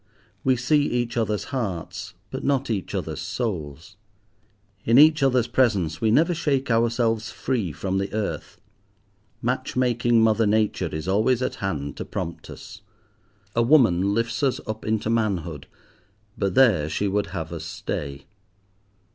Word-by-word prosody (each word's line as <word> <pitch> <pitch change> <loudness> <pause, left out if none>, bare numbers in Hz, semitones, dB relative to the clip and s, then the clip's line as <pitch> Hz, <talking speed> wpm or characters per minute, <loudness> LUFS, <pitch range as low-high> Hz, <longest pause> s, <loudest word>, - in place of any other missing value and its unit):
We 130 -1 +3
see 135 +5 +2
each 120 -1 -1
other's 110 -3 0
hearts, 100 -10 -4 0.2
but - - -5
not 135 -3 0
each 100 -4 -3
other's - - -3
souls. 90 - -4 0.9
In 115 +2 +4
each 155 +1 +7
other's 130 -3 +3
presence 110 -10 +1
we 110 - +2
never 160 +10 +4
shake 140 -5 0
ourselves 115 -1 +1
free 110 -8 -2
from 95 +5 -2
the 100 0 -3
earth. 110 -1 -4 0.8
Match - - -2
making 120 -2 +2
mother 110 0 +3
Nature 105 -4 +1
is 80 +3 -5
always 115 +6 +2
at - - -2
hand 70 -8 -3
to - - -4
prompt 85 -2 -6
us. 105 -2 -11 0.7
A 115 - +3
woman 110 - +4
lifts 115 +2 -1
us 135 -3 +1
up 110 -1 -5
into 110 0 0
manhood, 85 -10 -1 0.7
but 100 -2 -1
there 105 - +4
she 100 - -1
would 100 +1 0
have 80 0 -5
us 80 -1 -6
stay. 70 -3 -5
110 Hz, 145 wpm, -24 LUFS, 95-120 Hz, 0.9 s, each